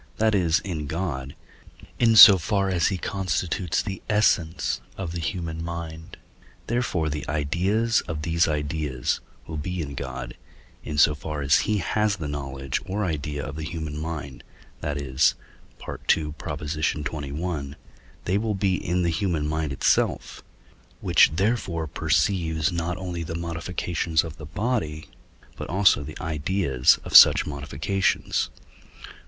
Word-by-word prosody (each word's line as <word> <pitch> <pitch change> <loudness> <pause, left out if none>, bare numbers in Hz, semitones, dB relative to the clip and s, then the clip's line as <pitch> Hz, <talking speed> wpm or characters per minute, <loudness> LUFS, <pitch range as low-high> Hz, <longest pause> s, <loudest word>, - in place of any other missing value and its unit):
that 110 0 +2
is, 85 -5 +2
in 80 -7 -4
God, 70 -5 -4 0.6
in 115 -2 +4
so 100 -3 +11
far 100 +2 0
as 85 -3 +2
he 95 - -1
constitutes 95 -2 -1
the 95 -2 -5
essence 95 -6 +1 0.2
of 90 -4 -4
the 85 - -4
human 80 -2 -4
mind; 85 -1 -7 0.5
therefore 120 -9 -1
the 75 -1 -3
ideas 95 +10 +1
of 80 -3 -4
these 85 +1 +2
ideas 75 -3 -2 0.3
will 80 - -6
be 90 +5 -4
in 70 -4 -4
God, - - -6 0.5
in 75 - -5
so 75 +1 +6
far 75 0 -5
as 70 0 +4
he 105 - +2
has 105 +2 0
the 80 -6 -5
knowledge 70 -2 -4
or 105 +2 -1
idea 75 -3 -3
of 70 - -6
the 80 - -5
human 80 -2 -5
mind, 75 -5 -6 0.4
that 75 -1 -3
is 65 0 +2 0.5
(II. - - -3
xxi.), 75 0 -2 0.5
they 95 +3 +1
will 110 -1 -1
be 95 -1 +1
in 90 +1 0
the 85 - +2
human 80 -4 -1
mind 80 -1 -2
itself, 70 - 0 0.6
which - - +4
therefore 95 -4 0
perceives 80 +1 0
not 85 +1 -2
only 90 -2 -5
the 85 0 -5
modifications 85 -1 -1
of 80 -2 -8
the 75 - -9
body, 90 -6 -2 0.5
but - - -6
also 95 -4 +4
the 75 +2 -8
ideas 80 -4 +2
of - - -5
such - - +9
modifications. 75 +7 -1
80 Hz, 140 wpm, -25 LUFS, 75-95 Hz, 0.6 s, so